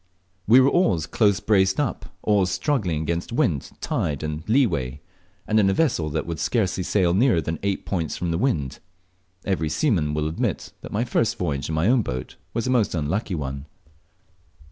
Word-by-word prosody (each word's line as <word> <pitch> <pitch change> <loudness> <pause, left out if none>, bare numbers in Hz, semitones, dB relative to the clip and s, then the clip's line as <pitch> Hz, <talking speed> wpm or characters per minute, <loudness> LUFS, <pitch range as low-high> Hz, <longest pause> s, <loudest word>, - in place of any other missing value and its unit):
We 120 +5 +8
were 130 +1 +5
always 90 - +2
close 100 -3 +2
braced 95 -1 +2
up, 135 -9 -2 0.2
always 100 -3 +2
struggling 95 - 0
against 85 +5 -3
wind, 95 - 0
tide, 70 -1 -2
and 75 0 -3
leeway, 70 - +1 0.5
and 110 0 +2
in 100 -2 +4
a 95 - +1
vessel 115 - +1
that 75 - -2
would 85 -2 -5
scarcely 95 +2 0
sail 90 -1 +2
nearer 110 -1 +3
than 80 0 -3
eight 100 -1 -2
points 85 -5 -2
from 85 -1 -2
the 80 - -1
wind. 75 - -1 0.7
Every 85 -5 0
seaman 80 - +1
will 75 0 0
admit 80 - -3
that - - -9
my 110 +3 0
first 115 -2 0
voyage 75 -6 -2
in 80 - -1
my 80 +5 +2
own 125 +1 +4
boat 65 - -5 0.2
was 115 -1 -2
a 130 - 0
most 115 -7 +2
unlucky 85 +6 -1
one. 70 -1 -5
90 Hz, 185 wpm, -24 LUFS, 75-110 Hz, 0.7 s, We